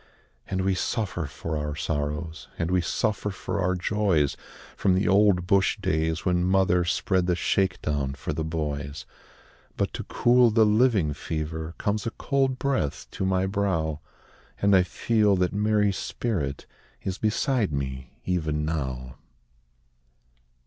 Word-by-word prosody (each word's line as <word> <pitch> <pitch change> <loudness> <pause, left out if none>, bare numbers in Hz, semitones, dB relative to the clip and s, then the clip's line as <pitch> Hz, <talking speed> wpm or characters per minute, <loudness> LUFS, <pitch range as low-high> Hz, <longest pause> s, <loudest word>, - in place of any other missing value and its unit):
And 95 -1 -1
we 95 0 +2
suffer 90 -4 -2
for 80 +2 -5
our 75 -1 -2
sorrows, 75 +1 -3
And 85 0 -1
we 90 -1 +3
suffer 105 +4 -1
for 100 +1 -3
our 95 +1 +1
joys, 90 -6 +1 0.4
From 95 -2 +2
the 95 - +1
old 100 -3 +4
bush 95 +3 +3
days 80 -4 -1
when 90 -1 +2
mother 90 -1 +3
Spread 90 +1 +1
the 90 - +2
shake 95 +1 +1
down 70 -3 -1
for 70 - -4
the 80 +1 -2
boys. 75 -3 -4 0.7
But - - -1
to - - -4
cool 120 0 +4
the 110 0 +4
living 105 - +3
fever, 80 +1 -4
Comes 105 +1 -1
a - - -1
cold 135 -2 +1
breath 130 - -1
to 95 - -2
my 95 0 +2
brow, 95 -6 0 0.6
And 100 0 +4
I 95 - +7
feel 105 +2 +2
that 90 0 0
Mary's 105 -1 +2
spirit 75 - -3 0.4
Is 95 0 -3
beside 110 - +1
me, 65 -2 -4
even 80 -4 0
now. 65 -5 -3
90 Hz, 145 wpm, -26 LUFS, 80-100 Hz, 0.7 s, I